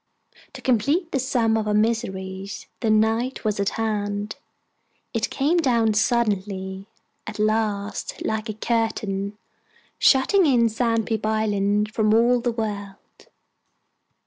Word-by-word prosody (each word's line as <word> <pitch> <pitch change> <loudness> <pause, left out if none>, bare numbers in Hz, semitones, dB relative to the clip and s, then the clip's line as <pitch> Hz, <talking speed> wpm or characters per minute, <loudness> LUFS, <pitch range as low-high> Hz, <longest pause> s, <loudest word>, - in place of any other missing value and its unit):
To - - -10
complete 280 - +1
the 270 - 0
sum 245 -4 +1
of 215 -1 -2
our 210 - +1
miseries, 195 -3 -2
the 225 - 0
night 225 +4 +1
was 210 -1 0
at 200 0 +1
hand. 205 -2 -2 0.8
It - - 0
came 295 +6 +1
down 235 -8 +2
suddenly, 200 -4 -1 0.4
at 220 -1 -6
last, 215 -1 -1
like 220 +1 -2
a 215 - -4
curtain, 210 -3 -1 0.6
shutting 320 +7 +4
in 235 -4 +4
Sandpeep 225 -1 0
island 210 -1 0
from 215 -1 +3
all 240 +2 +4
the 240 0 -1
world. 205 -3 -6
220 Hz, 120 wpm, -23 LUFS, 205-235 Hz, 0.8 s, shutting